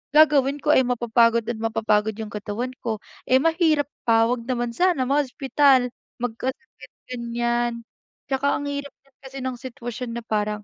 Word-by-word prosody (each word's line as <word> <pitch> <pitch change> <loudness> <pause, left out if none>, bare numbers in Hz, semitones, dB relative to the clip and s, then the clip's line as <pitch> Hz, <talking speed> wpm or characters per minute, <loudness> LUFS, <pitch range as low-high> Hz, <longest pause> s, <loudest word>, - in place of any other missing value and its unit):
Gagawin 290 -2 +5
ko 300 - +3
ay 260 -4 +4
mapapagod 235 -1 +3
at 225 - -6
mapapagod 220 -1 +1
yung 215 -1 -6
katawan 210 +4 -4
ko, 220 -3 -4 0.2
eh, 260 +3 +4
mahirap 325 -4 +2 0.2
pa 225 -1 +5
'wag 235 0 -1
naman 240 -2 -1
sana 350 +1 +2
ma-hospital, 270 -1 +2 0.3
magkasakit 255 - -5 0.2
ganyan. 235 0 -1 0.5
'Tsaka 275 +1 +1
ang - - -3
din 285 0 -2
hirap 285 0 -9 0.3
kasi 270 -1 -8
ng 255 -2 -4
sitwasyon 240 -1 -6
na 235 - -5
parang, 210 -1 -2
245 Hz, 150 wpm, -23 LUFS, 230-275 Hz, 0.5 s, Gagawin